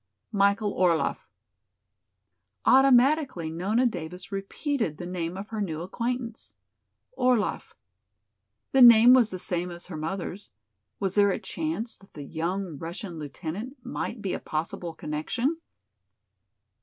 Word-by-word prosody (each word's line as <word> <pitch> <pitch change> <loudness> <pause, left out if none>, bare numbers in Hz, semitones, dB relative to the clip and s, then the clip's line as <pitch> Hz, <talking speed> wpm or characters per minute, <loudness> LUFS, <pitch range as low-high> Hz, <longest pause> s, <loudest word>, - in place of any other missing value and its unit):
"Michael 200 0 +2
Orlaff." 170 -3 +1 1.4
Automatically 265 - +4
Nona 200 +9 +1
Davis 180 -3 -4
repeated 195 - -2
the 175 - -6
name 175 0 -4
of 200 +2 -7
her 220 -2 -3
new 160 -5 -3
acquaintance. 235 +4 -4 0.6
"Orlaff." 250 -5 0 1.0
The 270 - +4
name 235 0 +9
was 245 -4 +5
the 185 - -5
same 180 -1 -2
as 175 0 -8
her 170 -4 -7
mother's. 180 +3 -5 0.5
Was 195 -2 -1
there 205 0 +4
a 190 - 0
chance 170 +9 -3
that 195 - -21
the 145 - -7
young 170 +1 -3
Russian 170 +1 -6
lieutenant 175 - -6
might 225 -2 -4
be 190 - -1
a - - -2
possible 165 +2 -4
connection? 235 - -2
195 Hz, 125 wpm, -27 LUFS, 170-235 Hz, 1.4 s, name